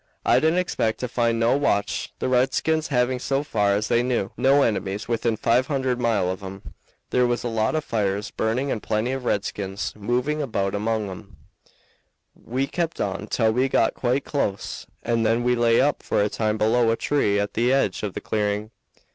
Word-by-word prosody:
I - - +5
didn't 160 +3 +2
expect 145 -11 0
to 125 - -1
find 115 -1 0
no 115 +3 +3
watch, 100 -8 0
the - - -2
redskins 135 +5 +1
having, 125 -1 +1
so 135 +2 -1
far 105 -8 +1
as 105 +2 -1
they 120 0 +3
knew, 120 -5 -1
no 140 +2 +4
enemies 100 -2 -1
within 115 -1 0
five 120 +4 +2
hundred 130 -3 -1
mile 105 -7 +1
of 95 - -6
'em. 95 0 -9 0.4
There 125 -1 +3
was 120 0 -1
a - - -1
lot 115 +3 0
of 155 - -1
fires 105 -2 -1
burning 125 +5 -1
and 110 - -2
plenty 110 +3 -1
of 135 -1 -4
redskins 100 -2 -2
moving 125 +8 -1
about 100 -8 -1
among 110 +1 -1
'em. 90 - -11 1.0
We 130 +4 -3
kept 165 +3 -3
on 100 +1 -2
till 110 -1 +2
we 130 +3 +1
got 115 - +2
quite 130 +2 -1
close, 105 -9 -3 0.2
and 115 -1 +1
then 115 +2 +2
we 125 0 +3
lay 120 -1 +3
up 145 - +2
for - - +1
a 105 - 0
time 110 0 -1
below 115 +2 +3
a 115 - +3
tree 105 -9 +1
at 100 0 -2
the 120 +3 +2
edge 135 -8 +1
of 105 -3 -4
the - - -4
clearing. 105 0 -1
115 Hz, 195 wpm, -24 LUFS, 105-130 Hz, 1.0 s, I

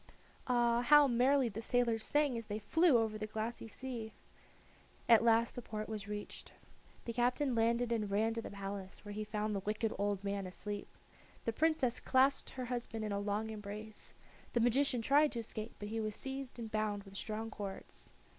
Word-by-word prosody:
Ah! 240 -1 +3
how 295 +3 +7
merrily 255 +2 +4
the 220 0 -5
sailors 230 -1 +2
sang 290 -3 +2
as 230 -2 -5
they 210 - -2
flew 320 - +4
over 220 -1 0
the 215 - -3
glassy 220 +2 -4
sea! 230 -1 -5 0.9
At 230 -1 +7
last 230 0 +4
the 245 - -6
port 215 -2 -5
was 210 -2 -5
reached. 205 0 -6 0.5
The 235 - -3
captain 250 +3 +1
landed 235 +1 +2
and 215 -3 0
ran 220 +3 +2
to 230 - -3
the - - -7
palace, 195 0 -6
where 205 - -6
he 215 +1 -3
found 210 0 -2
the 200 - 0
wicked 215 +3 -1
old 200 -1 0
man 200 -1 -2
asleep. 205 +2 -5 0.6
The 230 - 0
Princess 305 -3 +2
clasped 270 +1 +3
her 255 -1 -5
husband 235 -2 -3
in 210 - -3
a 200 - 0
long 210 +2 -1
embrace. 210 0 -8 0.4
The 240 - +2
magician 245 +1 +3
tried 290 +4 +4
to 235 - -2
escape, 220 0 -6
but 205 - -6
he 225 +1 -2
was 215 -1 -3
seized 270 -1 -6
and 225 -2 -6
bound 215 -2 -1
with 195 -1 -13
strong 220 +2 -4
cords. 200 -2 -7
225 Hz, 190 wpm, -35 LUFS, 210-245 Hz, 0.9 s, how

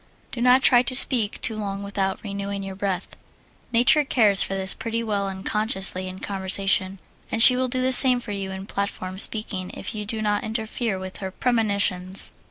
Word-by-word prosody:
Do 235 - -6
not 250 +2 +4
try 245 -2 +5
to 255 +1 -1
speak 235 -5 +3
too 225 - +2
long 200 -2 -5
without 195 -1 -3
renewing 200 -1 -5
your 195 0 -7
breath. 190 -1 -4 0.6
Nature 245 +6 +4
cares 215 -8 +4
for 195 - -1
this 190 0 +4
pretty 230 -1 -4
well 205 -3 -2
unconsciously 190 -1 -2
in 185 0 -8
conversation, 195 0 0 0.3
and 225 - +4
she 250 - +8
will 255 0 -1
do 255 0 -2
the 260 - +1
same 255 -1 +5
for 235 -3 -9
you 195 -1 -5
in 190 0 -7
platform 195 -2 -5
speaking 200 -4 +1
if - - -7
you 210 -1 -5
do 225 +1 -4
not 210 -1 -1
interfere 220 -1 -4
with 185 0 -8
her 190 -2 -6
premonitions. 200 -4 -1
200 Hz, 185 wpm, -23 LUFS, 195-230 Hz, 0.6 s, she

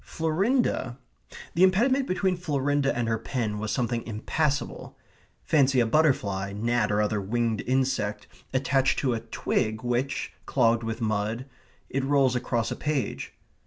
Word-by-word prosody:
Florinda 165 - 0 0.6
the 170 - 0
impediment 245 +9 +4
between 185 0 +1
Florinda 145 -4 0
and 120 -2 0
her 115 -1 0
pen 110 -3 -2
was 110 0 -3
something 120 -2 -1
impassable. 140 +7 -2 0.5
Fancy 135 -4 +3
a 120 - +4
butterfly, 110 -9 +1
gnat, 115 +1 0
or 105 +1 +2
other 105 -1 0
winged 115 +1 -1
insect, 130 -5 0 0.3
attached 135 0 +2
to 130 -3 +1
a 115 - -1
twig 110 0 -2
which, 125 +3 -1
clogged 115 -3 +3
with 115 +1 -4
mud, 110 +3 -1 0.4
it 135 0 -2
rolls 135 -2 +3
across 120 -2 -1
a - - -2
page. 135 - -2
125 Hz, 140 wpm, -27 LUFS, 110-145 Hz, 0.6 s, impediment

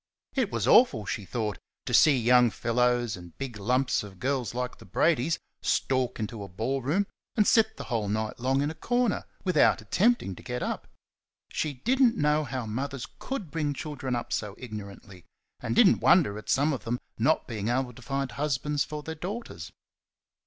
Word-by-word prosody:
It 255 -7 0
was - - -1
awful, 130 - +5
she 100 +1 -4
thought, 105 -3 -3 0.3
to - - -4
see 145 -4 +6
young 125 0 +5
fellows 120 +1 +1
and 85 -2 -12
big 130 -5 -5
lumps 125 +5 +1
of 100 -2 -10
girls 130 -3 -1
like 125 0 -3
the - - -13
Bradys 165 0 +2 0.2
stalk 130 -3 0
into 110 0 -4
a 100 - -6
ballroom 135 - -1 0.3
and 210 - +5
sit 220 0 +3
the - - -5
whole 110 -5 -2
night 110 +2 -2
long 135 +3 +1
in 145 - -1
a - - -7
corner, 245 +5 0 0.2
without 185 -2 +4
attempting 215 - +1
to - - -12
get 125 0 -4
up. - - -3 0.6
She 150 -2 -2
did 245 - 0
n't 240 -3 +5
know 150 +1 +2
how 130 -4 -4
mothers 130 +4 -4
COULD 220 - -5
bring 150 -3 -1
children 135 -4 -4
up 120 - -4
so 105 -2 -3
ignorantly, 100 -5 -9 0.3
and - - -2
did - - +7
n't - - +3
wonder 100 - +5
at - - -12
some 145 +3 +3
of 120 -6 -5
them 120 +1 -2 0.2
not 155 +8 +2
being 110 -3 -4
able 125 +1 0
to 130 - -14
find 135 +1 -2
husbands 145 0 -1
for 150 -1 -6
their 160 - -5
daughters. 180 - -6
130 Hz, 190 wpm, -28 LUFS, 115-150 Hz, 0.6 s, did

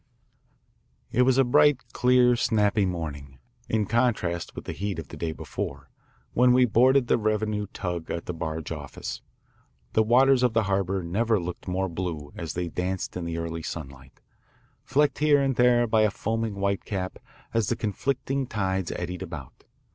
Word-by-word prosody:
It 125 - +2
was 130 0 +4
a 135 - +6
bright 125 -1 +3
clear 125 -1 +4
snappy 105 -3 +2
morning, 70 -6 -5 0.3
in 110 -1 +1
contrast 105 -7 0
with - - -7
the - - -4
heat 100 -2 -3
of 80 -4 -7
the - - -8
day 85 -1 -3
before, - - -6 0.4
when 125 +1 +5
we 125 0 +5
boarded 125 +3 +4
the 120 - +2
revenue 105 -1 0
tug 90 -4 -4
at 85 - -3
the 90 - -4
Barge 80 -1 -4
Office. - - -6 0.7
The 110 - +4
waters 125 +4 +5
of 125 -3 +2
the 110 - +3
harbour 95 -1 0
never 110 +5 +1
looked 90 +1 -6
more 95 +1 0
blue 80 -5 -5
as 80 -3 -5
they 90 0 -2
danced 90 +2 -3
in 90 -2 -4
the 85 0 -3
early 85 0 -4
sunlight, 70 -4 -8 0.6
flecked 145 +2 +1
here 150 -1 +5
and 135 -2 +1
there 120 0 +4
by 110 -1 +3
a 110 - +4
foaming 110 +1 -2
whitecap 100 -1 -2 0.3
as 115 -3 +1
the 120 - +1
conflicting 130 +5 -2
tides 95 -5 -1
eddied 90 +1 -5
about. 80 -8 -8
100 Hz, 170 wpm, -26 LUFS, 85-120 Hz, 0.7 s, a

